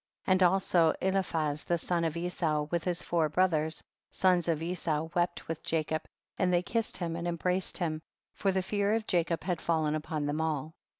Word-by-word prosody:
58. -, -, 0 dB
And 185 Hz, 0 st, +4 dB
also 175 Hz, -4 st, +3 dB
Eliphaz, 165 Hz, -6 st, 0 dB
the 175 Hz, -, +1 dB
son 170 Hz, +1 st, -1 dB
of 165 Hz, 0 st, -1 dB
Esau, 170 Hz, -3 st, 0 dB
with 170 Hz, -1 st, 0 dB
his 180 Hz, -1 st, 0 dB
four 165 Hz, -3 st, +1 dB
brothers, 160 Hz, -2 st, +1 dB, 0.3 s
sons 180 Hz, -3 st, +2 dB
of 160 Hz, -1 st, 0 dB
Esau, 165 Hz, -2 st, -1 dB
wept 175 Hz, -1 st, 0 dB
with 165 Hz, -1 st, -4 dB
Jacob, 155 Hz, -1 st, -1 dB, 0.3 s
and 180 Hz, -, +3 dB
they 175 Hz, 0 st, +3 dB
kissed 230 Hz, +3 st, -1 dB
him 170 Hz, -2 st, -2 dB
and 170 Hz, +1 st, -3 dB
embraced 180 Hz, +2 st, -1 dB
him, 160 Hz, -3 st, -2 dB, 0.3 s
for 195 Hz, -, +1 dB
the 190 Hz, 0 st, 0 dB
fear 205 Hz, +2 st, +1 dB
of 225 Hz, -1 st, -1 dB
Jacob 170 Hz, -4 st, 0 dB
had 180 Hz, -3 st, -1 dB
fallen 160 Hz, -2 st, +1 dB
upon 155 Hz, -1 st, -2 dB
them 145 Hz, +2 st, -1 dB
all. 155 Hz, -1 st, -2 dB
170 Hz, 190 wpm, -30 LUFS, 160-180 Hz, 0.3 s, And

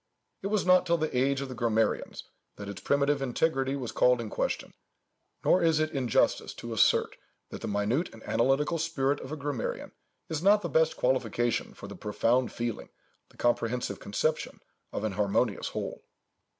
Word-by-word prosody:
It 195 Hz, -, -2 dB
was 210 Hz, -2 st, 0 dB
not 185 Hz, 0 st, +5 dB
till 170 Hz, 0 st, +3 dB
the 155 Hz, -4 st, -2 dB
age 135 Hz, +2 st, +2 dB
of 140 Hz, -, -4 dB
the 130 Hz, -, -7 dB
grammarians 115 Hz, -2 st, 0 dB, 0.3 s
that 100 Hz, -, -8 dB
its 100 Hz, -1 st, -7 dB
primitive 140 Hz, 0 st, +2 dB
integrity 135 Hz, +1 st, 0 dB
was 130 Hz, -4 st, -4 dB
called 125 Hz, -1 st, +4 dB
in 115 Hz, -2 st, -5 dB
question; -, -, -2 dB, 0.7 s
nor 185 Hz, -, +5 dB
is 160 Hz, -2 st, +3 dB
it 155 Hz, 0 st, 0 dB
injustice 125 Hz, -5 st, +1 dB
to 120 Hz, -1 st, -6 dB
assert, 110 Hz, -, +3 dB, 0.3 s
that -, -, -7 dB
the -, -, -4 dB
minute 105 Hz, -, 0 dB
and 115 Hz, -, -14 dB
analytical 135 Hz, +7 st, +1 dB
spirit 135 Hz, -1 st, 0 dB
of 130 Hz, -, -8 dB
a 155 Hz, -, -4 dB
grammarian 140 Hz, -4 st, -4 dB, 0.4 s
is 160 Hz, -2 st, -3 dB
not 205 Hz, +2 st, +5 dB
the 170 Hz, -, -2 dB
best 160 Hz, +1 st, +2 dB
qualification 120 Hz, -2 st, 0 dB
for -, -, -10 dB
the -, -, -8 dB
profound 115 Hz, +4 st, +1 dB
feeling, 120 Hz, -2 st, -4 dB, 0.4 s
the -, -, -23 dB
comprehensive 120 Hz, -3 st, 0 dB
conception 155 Hz, +9 st, -2 dB, 0.3 s
of -, -, -4 dB
an 110 Hz, -, 0 dB
harmonious 100 Hz, +2 st, 0 dB
whole. -, -, -5 dB
130 Hz, 175 wpm, -29 LUFS, 115-155 Hz, 0.7 s, not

